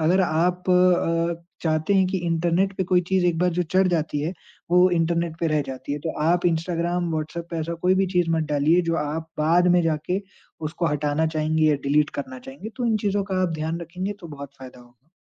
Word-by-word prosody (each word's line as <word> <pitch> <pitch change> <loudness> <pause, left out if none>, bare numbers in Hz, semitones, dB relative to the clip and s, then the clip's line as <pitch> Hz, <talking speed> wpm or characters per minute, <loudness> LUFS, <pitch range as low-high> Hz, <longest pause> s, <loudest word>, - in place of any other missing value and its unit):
अगर 175 +4 +3
आप 180 +2 0
अ, 170 -2 +2 0.2
चाहते 160 +4 +1
हैं 190 -1 +4
कि 190 0 -1
इंटरनेट 170 +3 +1
पे 190 - 0
कोई 180 0 +3
चीज़ 190 -2 +2
एक 170 -2 +1
बार 180 +1 +2
जो 180 - +2
चढ़ 185 +3 +2
जाती 160 -4 -1
है, 160 +5 -2 0.4
वो 180 +1 +5
इंटरनेट 170 -1 0
पे 165 - +1
रह 155 -1 +1
जाती 135 +1 -6
है, 145 - -2
तो 160 +2 -3
आप 175 +2 +2
इंस्टाग्राम, 170 +1 -1
व्हाट्सऐप 160 +2 -4
पे 170 - -3
ऐसा 165 +2 -3
कोई 185 +1 +4
भी 190 0 +2
चीज़ 175 -2 +2
मत 160 -1 +1
डालिए, 150 +5 +3
जो 165 0 -1
आप 155 +2 -3
बाद 170 +4 +3
में 175 - +5
जाके 165 +4 -1 0.5
उसको 170 +1 -2
हटाना 150 +2 0
चाहेंगे 155 +1 +1
या 150 - +4
डिलीट 145 +1 +2
करना 130 -1 -8
चाहेंगे, 135 - -9
तो 250 - -2
इन 220 -1 +2
चीज़ों 200 0 +1
का 185 0 +1
आप 175 - 0
ध्यान 160 +2 -2
रखेंगे, 180 +4 -4
तो 170 - -9
बहुत 140 -2 -8
फ़ायदा 130 -1 -11
होगा। 120 +5 -23
170 Hz, 220 wpm, -24 LUFS, 155-180 Hz, 0.5 s, वो